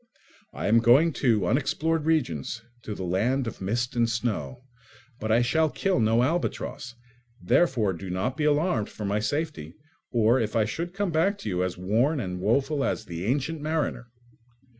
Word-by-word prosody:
I - - -5
am 115 +3 +5
going 135 +8 +5
to 110 -8 +3
unexplored 150 - 0
regions, 115 - -1 0.2
to 105 -3 -6
"the 95 - -5
land 115 +10 0
of 115 - -6
mist 120 +6 -1
and 120 -1 +2
snow," 120 +2 -3 0.6
but 110 0 -2
I 115 +2 +4
shall 160 +6 +2
kill 190 0 0
no 115 +2 +3
albatross; 145 -4 -2 0.4
therefore 110 - +2
do 95 +2 -7
not 95 +9 -2
be 150 +1 -1
alarmed 150 - +1
for 105 - -7
my 100 +1 0
safety 125 - -3 0.3
or 115 +2 +3
if 110 -2 -2
I 110 -2 +3
should 170 - -4
come 200 -2 -1
back 180 +6 +2
to 110 - -4
you 90 -1 0
as 90 -1 -3
worn 115 - +1
and 90 -5 -4
woeful 135 +7 +1
as 110 - -2
the 85 0 -5
"Ancient 145 +6 -1
Mariner." 155 -5 -2
120 Hz, 175 wpm, -26 LUFS, 105-150 Hz, 0.6 s, am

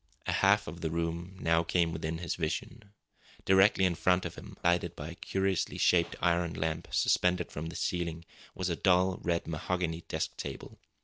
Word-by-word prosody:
A - - 0
half - - +4
of 85 +3 -7
the 80 - -1
room 85 +3 -3 0.3
came 85 -2 +2
within 80 0 -3
his 85 0 -3
vision. 90 +6 -4 0.5
Directly 95 0 +5
in 90 - +2
front 90 +2 +2
of - - -4
him, - - -11
lighted 85 0 +2
by 75 +1 -6
a - - -7
curiously 95 +1 -1
shaped 85 -1 +3
iron 85 -2 +1
lamp 80 0 -2
suspended 90 -1 +2
from 75 +2 -5
the 80 - -7
ceiling, 85 -2 -2 0.3
was 95 -1 -2
a - - 0
dull 90 +1 +3
red 85 -1 0
mahogany 85 +1 -2
desk - - -2
table. - - -7
85 Hz, 175 wpm, -31 LUFS, 80-90 Hz, 0.5 s, Directly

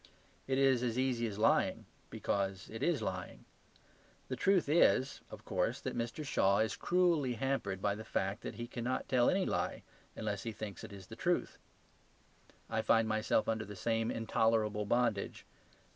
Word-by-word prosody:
It 135 0 +1
is 135 -3 +4
as 120 -1 -1
easy 125 -3 +1
as 100 -2 -6
lying; 110 - +2 0.2
because 95 -2 -2
it 110 - -6
is 160 -10 +1
lying. 90 -3 -5 0.8
The 130 - -1
truth 185 +7 +3
is, 145 -3 +3
of - - -11
course, - - 0
that - - -4
Mr. 120 +6 -3
Shaw 100 -7 +3
is 110 0 +1
cruelly 170 -8 +2
hampered 115 -6 -2
by 100 - +2
the 110 +2 -7
fact 100 0 -2
that - - -6
he 120 - -5
cannot 120 +1 -3
tell 125 -2 +4
any 190 0 +2
lie - - -2 0.3
unless 105 -2 -3
he 115 - -4
thinks 105 -4 -7
it - - -8
is 100 -2 -10
the - - -10
truth. - - -1 1.1
I 110 - -1
find 115 0 +3
myself 110 0 +1
under 110 -1 0
the 105 0 -9
same 115 +3 0
intolerable 110 -2 +1
bondage. 120 -3 0
115 Hz, 170 wpm, -34 LUFS, 105-130 Hz, 1.1 s, is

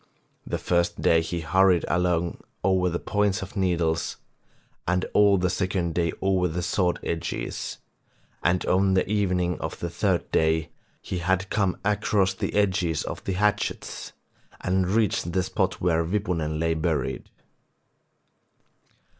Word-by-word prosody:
The - - -1
first 85 -1 0
day 80 0 +5
he 85 +1 -3
hurried 90 +1 +3
along 85 -1 0 0.2
over 95 -1 +3
the 85 - -1
points 105 0 0
of 95 - -10
needles, 85 -4 0 0.7
and 90 +1 +1
all 100 -1 +5
the 90 0 +1
second 90 -3 -1
day 85 0 +1
over 95 -2 +2
the 85 +1 -3
sword 90 0 +1
edges, 85 -1 -3 0.6
and 90 +1 +1
on 95 +1 +3
the 95 - +2
evening 90 -4 0
of - - -5
the - - -4
third - - 0
day 80 0 +2 0.3
he 90 - -3
had 95 +2 0
come 100 -4 +1
across 105 -2 +2
the - - -3
edges 95 -6 +1
of - - -6
the 95 - -1
hatchets 105 +2 -1 0.5
and 95 0 +1
reached 100 -5 +1
the 95 - +2
spot - - -1
where 85 -2 +2
Wipunen 85 -4 -1
lay 80 0 +1
buried. 80 -4 -2
90 Hz, 140 wpm, -25 LUFS, 85-95 Hz, 0.7 s, day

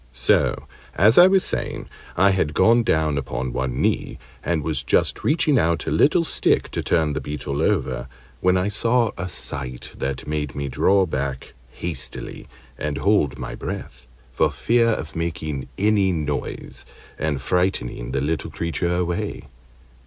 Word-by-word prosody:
So, 60 0 +2 0.3
as 110 - +6
I 180 - +10
was 190 0 +4
saying, - - -2 0.3
I 95 +3 +5
had 80 -6 0
gone 115 +1 +5
down 80 -8 +1
upon 65 -2 -4
one 65 -1 -2
knee, - - 0 0.3
and 80 -3 0
was 75 -3 -1
just - - +1
reaching 150 -3 +3
out 85 -4 +1
a - - -2
little 145 - +4
stick 160 - +1
to - - -2
turn 80 -3 +1
the 75 - -3
Beetle 70 0 -4
over, 75 -9 0 0.3
when 90 0 +3
I 90 +2 +1
saw 115 +2 +2
a 90 -1 -4
sight 65 -7 -5
that 65 -1 -4
made 75 -3 -3
me 70 -1 -3
draw 95 +8 +3
back 70 -4 -4 0.2
hastily 65 0 -5 0.3
and 75 -1 -2
hold 75 -3 +2
my - - -5
breath, 60 -1 -7 0.2
for - - +2
fear 115 0 +2
of 95 -9 -2
making 80 -4 -3
any 100 -2 +3
noise 75 -4 -4 0.4
and 75 -2 -1
frightening 90 -8 -1
the 70 - -1
little 75 +1 -2
creature 85 +1 -2
a 90 0 +1
way. 85 0 -3
80 Hz, 160 wpm, -23 LUFS, 70-95 Hz, 0.4 s, I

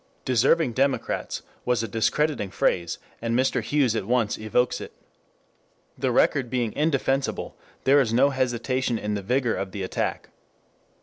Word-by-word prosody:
"Deserving 130 +3 +3
Democrats" 135 +2 -1 0.2
was 120 -2 +1
a - - -2
discrediting 115 +1 0
phrase, 85 -2 0 0.2
and 115 0 0
Mr. 130 +1 +1
Hughes 135 -6 +1
at 105 - -2
once 120 -3 +1
evokes 110 +3 0
it. - - -8 1.0
The - - -1
record 130 -4 +2
being 120 -3 -1
indefensible, 135 -3 0 0.3
there 140 +2 +5
is 115 -5 0
no 135 +5 +4
hesitation 130 -1 0
in 105 -1 -3
the 100 - -2
vigor 125 +3 0
of 95 -1 -4
the 100 - -4
attack. 95 - -3
125 Hz, 145 wpm, -25 LUFS, 110-135 Hz, 1.0 s, there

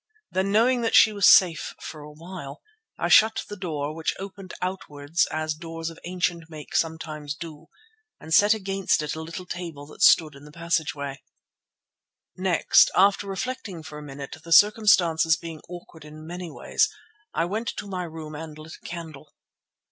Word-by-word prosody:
Then 190 +1 0
knowing 240 +4 +3
that 225 - +1
she 215 - +7
was 200 -2 +5
safe 175 -4 +5
for 155 - -8
a 150 +1 -10
while, 155 -2 -9 0.3
I - - -1
shut 220 +1 +5
the 205 - -7
door, 155 -6 -4
which 160 0 -2
opened 195 -1 -9
outwards 165 -4 -2
as 155 0 -2
doors 165 +1 -6
of 165 - -14
ancient 175 -2 -2
make 155 -2 -9
sometimes 155 -3 -2
do, 160 -1 -10 0.5
and 160 - -6
set 205 +5 +6
against 195 -5 0
it 150 - -3
a 160 - -5
little 165 +3 -7
table 170 -5 -7
that 150 - -14
stood 155 -2 +6
in 140 +1 -14
the 150 - -13
passage. 170 -1 -1 1.4
Next, 185 -2 +4
after 200 +1 +4
reflecting 195 -4 -5
for 155 -1 -9
a - - -9
minute, 140 -1 -8
the 170 - -11
circumstances 175 -5 +5
being 165 -2 -8
awkward 175 -2 -11
in 155 +1 -11
many 175 +1 -6
ways, - - 0 0.5
I 165 - +1
went 215 +6 -3
to - - -5
my 185 -2 -4
room 160 -2 -8
and 155 0 -8
lit 155 +1 -10
a - - -10
candle. 155 -4 -9
165 Hz, 170 wpm, -25 LUFS, 155-185 Hz, 1.4 s, she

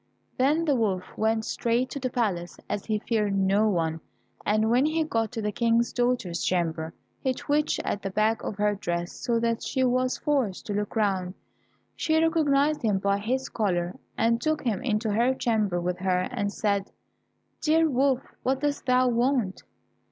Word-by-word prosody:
Then 295 +6 +2
the 295 - +3
wolf 205 -7 0
went 220 0 +1
straight 240 +2 0
to 280 - -4
the 255 -1 -2
palace, 200 -9 -2
as 205 - -3
he 215 -1 +1
feared 210 -2 0
no 195 +3 +3
one, 165 -4 -1 0.4
and 215 +2 +2
when 250 +3 +4
he 320 +1 +1
got 225 -7 -1
to 225 -3 -3
the 210 - 0
King's 230 +2 +1
daughter's 240 -9 0
chamber, 165 -2 -1 0.2
he 260 -1 0
twitched 295 +3 0
at 205 - -2
the 195 - -3
back 215 +3 +1
of - - -4
her 210 0 +1
dress, 175 -3 -3
so 235 -2 -1
that 230 0 0
she 260 - -1
was 255 0 +1
forced 265 -11 -1
to 205 - -3
look 205 +2 -3
round. 190 -4 0 0.6
She 315 0 +1
recognized 305 -2 +2
him 210 -4 +2
by 200 +1 +1
his 260 +5 -1
collar, 180 -5 -1 0.2
and 230 +1 +2
took 310 -1 0
him 225 -6 -1
into 215 -2 0
her 240 +5 +2
chamber 215 -8 0
with 180 +1 -2
her, 185 -1 +1
and 200 0 -1
said, 200 -2 -1 0.7
"Dear 320 +1 +3
Wolf, 265 -2 +2 0.2
what 265 +1 0
dost 290 -2 -2
thou 255 0 +4
want?" 240 -4 +1
225 Hz, 180 wpm, -26 LUFS, 200-255 Hz, 0.7 s, when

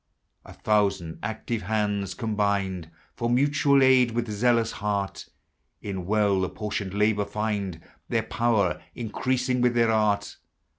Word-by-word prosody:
A - - -12
thousand 100 -6 0
active 110 +2 -3
hands, 100 -2 -1
combined 100 -6 -1 0.3
For 120 -1 -2
mutual 140 +2 +3
aid, 130 -2 +5
with 120 -1 -2
zealous 115 +1 +2
heart, 100 -1 -3 0.5
In 95 -3 -5
well 100 -2 +2
apportioned 100 0 -4
labor 105 0 +2
find 100 -4 -3 0.3
Their - - +1
power 110 -4 0
increasing 125 +2 -1
with 125 -1 +2
their 115 -1 +3
art. 105 -2 +1
105 Hz, 120 wpm, -26 LUFS, 100-120 Hz, 0.5 s, aid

